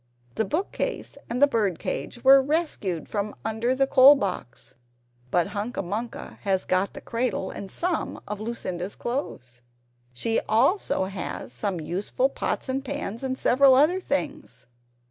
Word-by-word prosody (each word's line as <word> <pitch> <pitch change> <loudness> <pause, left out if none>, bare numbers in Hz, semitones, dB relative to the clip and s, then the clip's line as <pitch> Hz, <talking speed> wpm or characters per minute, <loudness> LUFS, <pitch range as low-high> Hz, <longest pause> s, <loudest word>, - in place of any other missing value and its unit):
The 220 - 0
book 330 - -2
case - - -3
and 240 - -2
the - - +8
bird 210 - 0
cage 240 - -5
were 270 +1 +8
rescued 265 - -1
from 205 0 -3
under 225 +3 0
the 270 +1 +3
coal 270 +1 +8
box 195 - -4 0.6
but 175 +4 +1
Hunca 205 +1 -3
Munca 215 +6 -5
has 190 -2 0
got 185 +2 +1
the - - -9
cradle, 230 -5 -2
and 195 - -7
some 345 - -1
of 210 0 -5
Lucinda's 195 -5 -4
clothes. 125 - -5 0.5
She 225 - 0
also 250 - +2
has 190 -1 -5
some 195 -5 -2
useful 195 - -1
pots - - -3
and 265 +1 -2
pans, 275 -6 -4
and 260 -1 -2
several 265 +1 +5
other 310 +8 +4
things. 295 -2 -4
230 Hz, 150 wpm, -26 LUFS, 195-275 Hz, 0.6 s, the